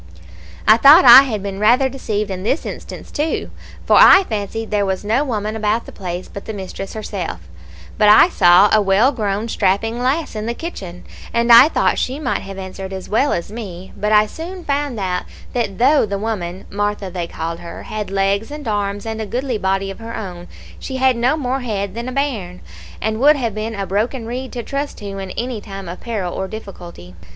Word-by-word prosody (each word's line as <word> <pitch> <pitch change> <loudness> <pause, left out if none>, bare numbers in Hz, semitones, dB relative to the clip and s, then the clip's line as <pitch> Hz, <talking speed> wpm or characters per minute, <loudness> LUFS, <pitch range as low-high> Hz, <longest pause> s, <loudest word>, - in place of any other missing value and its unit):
"I 215 - +7
thought 290 +8 +8
I 250 +2 +11
had 215 -6 -4
been 195 -1 -5
rather 245 +6 +4
deceived 215 -6 -3
in 185 -1 -4
this 245 - -1
instance - - -8
too, 300 +2 -2 0.3
for - - +4
I 385 - +8
fancied 220 - -4
there 205 -1 +1
was 190 0 -2
no 230 +7 +2
woman 215 -5 -3
about 220 +1 0
the - - -10
place 180 -2 -6
but 200 - -9
the 220 - -5
mistress 195 0 -7
herself; 195 - -5 0.6
but 210 - +5
I 215 +10 +8
saw 180 - +5
a 215 - +5
well 205 +7 +3
grown 210 -3 -2
strapping 225 +3 0
lass 275 +2 -1
in 215 +1 -4
the 235 - -2
kitchen, 190 - -7 0.3
and 235 +1 +2
I 240 +6 +9
thought - - +1
she 260 +2 -2
might 305 - -2
have 195 0 -9
answered 190 0 -7
as 190 -1 -7
well 225 -1 +1
me; 190 -5 -8
but 210 +1 -2
I 210 0 +5
soon 345 - -8
found 280 -4 -2
out 180 -2 -2 0.3
that 225 -6 -2
though 270 0 +4
the 200 0 -3
woman 195 -4 -4
(Martha 205 -1 -2
they 175 -2 -4
called 165 +1 -5
her) 170 -1 -9
had 210 -2 -5
legs 195 +2 0
and 295 -3 -8
arms 205 -1 -2
and 220 0 -4
a 215 - -4
goodly 245 +1 -2
body 195 0 -1
of 195 - -11
her 230 0 -7
own, 180 -3 -7 0.3
she 265 - -6
had 260 -1 +3
no 250 +6 +1
more 265 -2 -2
head 200 -6 -3
than 235 +3 -5
a - - -6
bairn, 230 -10 -3 0.4
and 220 0 -2
would 295 +4 +6
have 235 -6 -2
been 215 +2 -4
a 200 -1 -3
broken 225 +5 -2
reed 250 +3 -5
to 240 -2 -4
trust 280 +3 -4
to 200 -1 -7
in 190 -1 -6
any 240 -2 -3
time 195 -2 -8
of 175 +2 -7
peril 205 -7 -3
or 190 - -3
difficulty. 175 - -10
215 Hz, 210 wpm, -19 LUFS, 195-245 Hz, 0.6 s, I